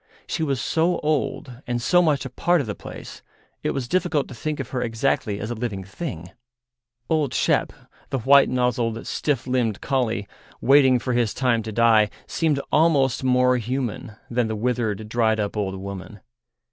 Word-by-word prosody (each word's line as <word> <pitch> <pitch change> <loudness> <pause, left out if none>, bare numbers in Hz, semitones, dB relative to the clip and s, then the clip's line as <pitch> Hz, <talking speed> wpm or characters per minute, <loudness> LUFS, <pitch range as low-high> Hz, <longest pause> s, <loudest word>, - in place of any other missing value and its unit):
She - - -3
was 140 -5 0
so 165 +6 +1
old 140 -4 -2
and 120 0 -1
so 175 +9 +4
much 150 -5 +1
a 135 - -6
part 175 +6 +2
of 140 - -1
the 105 - -3
place, - - -10 0.4
it - - -1
was 130 -3 -2
difficult 175 -2 0
to - - -8
think 150 +5 -4
of 135 -2 -4
her 125 - -2
exactly 110 -3 -1
as 105 +3 -4
a - - 0
living 110 -5 -4
thing. 95 - -7 0.8
Old 155 -5 0
Shep, - - +2 0.4
the 135 - -1
white 140 +3 +5
nozzled, 120 -2 0
stiff 145 -5 -1
limbed 125 -5 0
collie, 120 -7 -1 0.3
waiting 135 -1 +5
for 125 +1 -2
his 120 -3 +1
time 125 -3 +1
to 110 0 -6
die, 110 -1 +4 0.2
seemed 155 -4 0
almost 140 -6 +3
more 125 0 +3
human 120 -2 -3
than 120 -1 0
the 110 - -3
withered, 110 -2 -1
dried 110 -1 +1
up 105 0 -2
old 100 -2 -2
woman. 100 +2 -8
125 Hz, 175 wpm, -23 LUFS, 110-140 Hz, 0.8 s, white